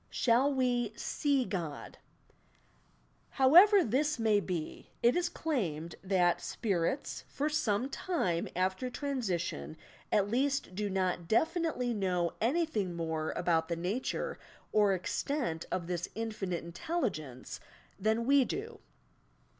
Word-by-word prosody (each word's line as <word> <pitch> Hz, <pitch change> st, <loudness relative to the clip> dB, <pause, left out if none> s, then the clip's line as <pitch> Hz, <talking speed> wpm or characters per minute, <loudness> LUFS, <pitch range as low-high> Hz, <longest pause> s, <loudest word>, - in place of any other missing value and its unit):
SHALL 250 Hz, +4 st, +3 dB
WE 245 Hz, -4 st, +1 dB
"see 280 Hz, 0 st, 0 dB
QOD"* 170 Hz, -7 st, -5 dB, 1.4 s
However 360 Hz, +9 st, +8 dB
this 290 Hz, +6 st, +1 dB
may 220 Hz, -3 st, +3 dB
be, 180 Hz, -5 st, -5 dB
it 240 Hz, +2 st, +5 dB
is 350 Hz, 0 st, +1 dB
claimed 175 Hz, -, -2 dB
that 185 Hz, -2 st, +2 dB
"spirits" 200 Hz, -, -2 dB
for 295 Hz, +2 st, -1 dB
some 245 Hz, -5 st, +1 dB
time 270 Hz, -, -1 dB
after 185 Hz, +7 st, 0 dB
transition 185 Hz, -, -3 dB, 0.3 s
at 205 Hz, -1 st, +3 dB
least 270 Hz, -1 st, 0 dB
do 205 Hz, +2 st, -2 dB
not 185 Hz, -3 st, -1 dB
definitely 310 Hz, -, +1 dB
know 180 Hz, -5 st, 0 dB
anything 230 Hz, -, 0 dB
more 160 Hz, -2 st, -2 dB
about 165 Hz, -2 st, +1 dB
the 170 Hz, -, -1 dB
nature 185 Hz, +9 st, -2 dB, 0.3 s
or 205 Hz, -2 st, +4 dB
extent 185 Hz, -, -2 dB
of 175 Hz, -, -1 dB
this 175 Hz, 0 st, -3 dB
Infinite 210 Hz, -6 st, -3 dB
Intelligence 170 Hz, -, -4 dB, 0.4 s
than 220 Hz, +3 st, +1 dB
we 275 Hz, +1 st, +5 dB
do. 440 Hz, -, -5 dB
215 Hz, 115 wpm, -32 LUFS, 175-270 Hz, 1.4 s, However